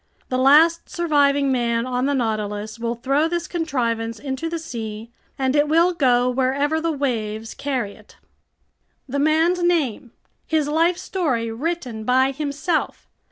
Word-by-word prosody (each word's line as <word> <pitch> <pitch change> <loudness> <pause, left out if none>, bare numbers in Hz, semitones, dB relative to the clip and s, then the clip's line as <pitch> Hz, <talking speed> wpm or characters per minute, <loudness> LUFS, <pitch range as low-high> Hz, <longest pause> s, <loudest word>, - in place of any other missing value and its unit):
The 255 - 0
last 310 +6 +5
surviving 285 -4 +2
man 235 -2 0
on 255 +1 -1
the 285 - +1
Nautilus 215 -2 -2
will 235 0 -2
throw 275 +6 +1
this 345 0 -2
contrivance 235 -9 -2
into 275 +3 -4
the 335 - -3
sea, 225 -7 -7 0.3
and 265 0 0
it 295 0 +3
will 335 +4 +3
go 250 -6 +3
wherever 270 +5 0
the 330 0 0
waves 225 -6 -3
carry 255 -8 -3
it." - - -19 0.9
The 280 +2 -2
man's 320 +4 +2
name! 300 -10 0 0.4
His 310 -2 +1
life 330 +4 +2
story 270 -12 -2
written 250 -3 -4
by 260 +3 +3
himself! 295 +4 -2
275 Hz, 145 wpm, -22 LUFS, 235-320 Hz, 0.9 s, last